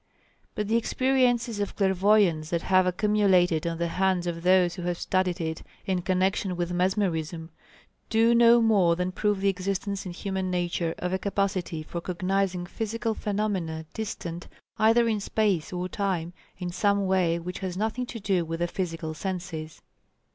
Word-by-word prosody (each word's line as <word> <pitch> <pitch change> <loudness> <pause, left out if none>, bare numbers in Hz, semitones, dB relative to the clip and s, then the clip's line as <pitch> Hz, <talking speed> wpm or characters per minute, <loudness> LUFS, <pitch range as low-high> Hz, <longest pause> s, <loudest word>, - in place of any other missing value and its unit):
But 210 -1 -2
the 225 +2 +3
experiences 245 -2 +1
of 205 - -3
clairvoyance 190 -4 +3
that 170 -1 -1
have 185 -1 +3
accumulated 180 -4 +2
on 165 0 -2
the 170 0 -1
hands 185 0 +1
of 170 -1 -3
those 180 -1 +4
who 185 - -7
have 175 0 -2
studied 185 0 0
it 160 -1 -3 0.2
in 185 -2 0
connection 190 +1 0
with 175 0 -2
mesmerism, 175 -3 -1 0.6
do 225 +1 +4
no 235 0 +6
more 195 -7 +4
than 180 +1 -2
prove 205 +1 0
the 200 - +3
existence 195 +1 -2
in - - -5
human 190 +1 -3
nature 175 -2 -1
of 180 +1 -3
a 190 - 0
capacity 190 -5 -1
for 170 +2 -6
cognizing 185 0 -1
physical 225 +4 -3
phenomena 195 -7 -2
distant 175 -5 -5 0.3
either 225 +2 +4
in 220 -2 +1
space 200 -5 0
or 180 0 -3
time, 180 -3 -2 0.2
in 180 -1 -4
some 200 +2 +1
way 185 -3 +2
which 175 +2 -6
has 185 -2 -4
nothing 225 +4 -2
to 235 - -6
do 195 -4 +1
with 165 0 -4
the 175 - +1
physical 165 -3 -4
senses. 170 -3 -5
185 Hz, 165 wpm, -27 LUFS, 175-205 Hz, 0.6 s, no